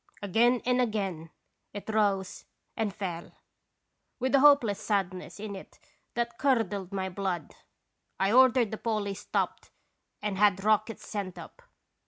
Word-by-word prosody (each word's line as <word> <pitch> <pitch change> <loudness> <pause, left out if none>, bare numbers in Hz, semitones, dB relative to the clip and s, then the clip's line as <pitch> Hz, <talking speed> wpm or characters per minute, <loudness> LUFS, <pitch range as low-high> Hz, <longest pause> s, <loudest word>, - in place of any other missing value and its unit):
" - - -26
Again 235 +5 +3
and 250 0 +3
again 195 -8 -2 0.4
it 205 - -7
rose 205 -3 0 0.3
and 220 -2 -1
fell, 180 -4 -6 0.8
with 260 +1 -1
a 275 - +6
hopeless 270 -8 +5
sadness 190 -2 -2
in 205 -1 -5
it 190 - -12 0.4
that 235 0 -2
curdled 210 -8 +1
my 190 -1 -2
blood. 185 -4 -3 0.7
I 195 +1 +2
ordered 250 -2 +5
the 220 - -5
Polly 215 -3 -1
stopped 205 - -3 0.5
and 205 -2 -3
had 200 -2 +4
rockets 215 +1 +1
sent 200 -4 -4
up. - - -11
205 Hz, 140 wpm, -29 LUFS, 195-230 Hz, 0.8 s, a